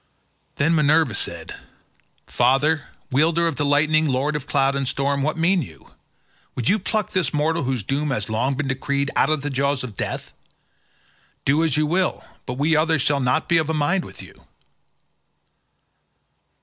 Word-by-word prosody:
Then 155 +4 +2
Minerva 150 -4 +3
said, - - -4 0.7
"Father, 145 +4 +2 0.3
wielder 165 +5 +2
of 160 -5 -2
the - - 0
lightning, 155 +2 +3
lord 140 +3 0
of 145 -1 -4
cloud 135 -1 +1
and 135 -1 -1
storm, 140 +1 0
what 155 +3 -1
mean 175 +3 +2
you? 80 - -11 0.6
Would 120 - -3
you 215 - +3
pluck 210 +1 -2
this 170 -7 0
mortal 160 +3 +1
whose 125 -4 -1
doom 145 +7 -1
has 110 -6 -2
long 120 +5 0
been 140 0 -2
decreed 140 +1 -1
out - - +3
of 155 -3 0
the 145 - -2
jaws 140 0 0
of 115 -5 -7
death? - - -4 1.1
Do 145 +4 +3
as 155 -3 +1
you 155 - +2
will, 180 +4 -1 0.2
but 125 - -4
we 155 +3 +2
others 155 -2 +2
shall 145 -1 +1
not 130 +4 0
be 170 - +3
of 160 -1 -2
a 160 - 0
mind 170 +5 +1
with - - -10
you." - - -13
145 Hz, 175 wpm, -22 LUFS, 135-160 Hz, 1.1 s, Minerva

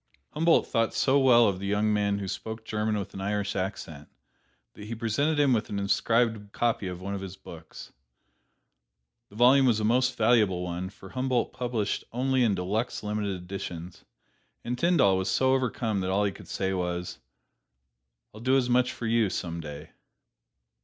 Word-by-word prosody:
Humboldt 165 +2 +3
thought 115 -1 0
so 140 +1 +3
well 120 -3 +6
of 95 -2 -1
the 100 - -4
young 105 +1 +1
man 100 -1 +1
who 100 -1 -4
spoke 110 +3 -6
German 110 0 -1
with 100 -1 -5
an 95 - -6
Irish 100 0 -2
accent, 85 -6 -5 0.6
that 105 - -11
he 115 +2 -5
presented 135 +7 0
him 140 -3 +4
with 110 -2 -1
an 100 - -3
inscribed 110 +1 +1
copy 115 -4 0
of 90 -1 -6
one 100 +2 -5
of 100 - -4
his 95 -1 -7
books. - - -12 1.4
The 100 - -17
volume 130 +3 +5
was 115 -3 +3
a - - -2
most 125 +3 +2
valuable 110 -6 +3
one, 90 +1 -4
for 95 0 -14
Humboldt 130 -1 -1
published 120 -4 -2
only 130 +2 +1
in 110 -4 +2
deluxe, 105 +8 -2
limited 105 -2 -2
editions, 90 -2 -7 0.6
and 120 - -2
Tyndall 125 - +3
was 95 - -1
so 130 0 +2
overcome 120 -5 -1
that 95 0 -2
all 100 +2 +2
he 100 - +1
could - - -13
say 95 0 -2
was, 90 -1 -3 1.1
"I'll 110 - -11
do 130 +2 +3
as 125 -2 0
much 125 0 +2
for 120 - -6
you 115 -2 +2
some 85 -2 -4
day." 75 0 -9
105 Hz, 180 wpm, -27 LUFS, 95-120 Hz, 1.4 s, well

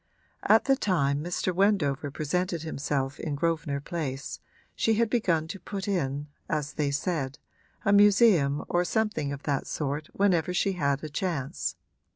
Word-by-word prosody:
At 220 +1 +4
the 270 - +4
time 150 - +1
Mr. 180 +2 -1
Wendover 165 -7 +2
presented 170 +4 -2
himself 140 -3 -2
in 150 -3 -3
Grosvenor 160 -2 -1
Place 140 -5 -4 0.4
she 225 - +2
had 225 0 +1
begun 170 -10 +1
to 195 - -6
put 195 +2 -5
in, 145 -7 -1 0.2
as 150 -2 -1
they 150 -2 0
said, 140 -2 -2 0.5
a 200 - +4
museum 200 -8 +5
or 175 0 +2
something 180 -7 0
of 140 0 -6
that 140 -2 -1
sort 150 +1 -3
whenever 180 -3 +2
she 195 - +2
had 140 -5 0
a 155 - -4
chance. 150 -4 -2
160 Hz, 155 wpm, -28 LUFS, 140-190 Hz, 0.5 s, museum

